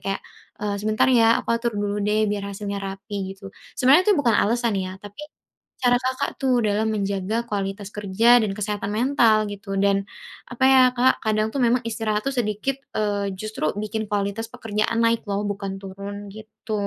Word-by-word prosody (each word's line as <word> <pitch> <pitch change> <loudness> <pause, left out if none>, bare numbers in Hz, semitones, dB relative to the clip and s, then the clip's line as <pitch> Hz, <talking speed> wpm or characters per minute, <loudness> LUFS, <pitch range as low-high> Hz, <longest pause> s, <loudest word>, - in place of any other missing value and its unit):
kayak, 195 - -1 0.4
eee, 205 -1 -1
"Sebentar 215 +3 +2
ya 230 -2 +5
aku - - -21
atur 235 0 -2
dulu 205 0 -1
deh 215 +1 +2
biar 200 -1 -3
hasilnya 200 0 -4
rapi 195 0 -5
gitu." 195 0 -11 0.3
Sebenernya 275 +8 +6
itu 410 - +6
bukan 240 -5 +3
alasan 235 0 +1
ya, 185 0 -5
tapi 205 +5 -10 0.6
cara 245 0 +4
Kakak 260 0 -2
tuh 255 -3 +2
dalam 210 +1 +1
menjaga 200 +2 -1
kualitas 200 0 -3
kerja 210 +4 +4
dan 205 -2 -1
kesehatan 205 -1 -3
mental 225 -3 +3
gitu 200 -1 -6
dan 200 0 +2 0.4
apa 250 +1 -2
ya, 265 -1 +7
Kak, 255 +2 +3
kadang 215 0 +1
tuh - - -5
memang 240 +1 +3
istirahat 215 -2 -1
tuh 275 - +1
sedikit, 240 +4 -1 0.2
eee, 205 -2 -1
justru 215 -5 -3
bikin 215 +1 -3
kualitas 205 +2 -1
pekerjaan 225 -1 -1
naik 230 0 +2
loh 200 +1 -1
bukan 195 -1 -4
turun 200 +1 -7
gitu. 220 +1 -10
210 Hz, 175 wpm, -23 LUFS, 200-230 Hz, 0.6 s, ya